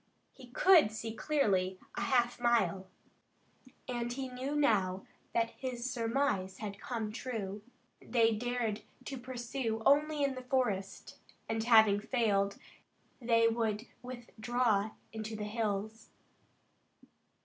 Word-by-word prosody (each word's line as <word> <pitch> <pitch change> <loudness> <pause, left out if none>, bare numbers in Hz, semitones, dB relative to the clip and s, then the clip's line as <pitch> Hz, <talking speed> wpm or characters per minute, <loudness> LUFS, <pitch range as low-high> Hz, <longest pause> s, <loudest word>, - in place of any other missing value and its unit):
He 260 -2 -13
could 320 - +5
see 220 0 -5
clearly 200 -10 +1 0.2
a - - -3
half 245 -2 +2
mile, 235 -5 +2 1.0
and 240 -1 -2
he 260 +1 -4
knew 260 +3 -4
now 195 -10 +2 0.3
that 230 0 +1
his 250 -1 -4
surmise 230 -5 0
had 200 -2 -6
come 225 -3 -3
true. 215 -4 -4 0.4
They 230 -2 +3
dared 235 -1 -2 0.2
to 270 -2 -5
pursue 240 -2 -3
only 295 +1 +4
in 275 -1 +1
the 255 - -6
forest, 245 -7 -2 0.3
and 225 0 -1
having 220 -3 +6
failed, 205 -4 +1 0.6
they 230 -1 +4
would 225 -1 0 0.2
withdraw 240 -3 -1 0.2
into 220 0 -5
the 210 - -4
hills. 215 0 -3
230 Hz, 115 wpm, -33 LUFS, 215-250 Hz, 1.0 s, having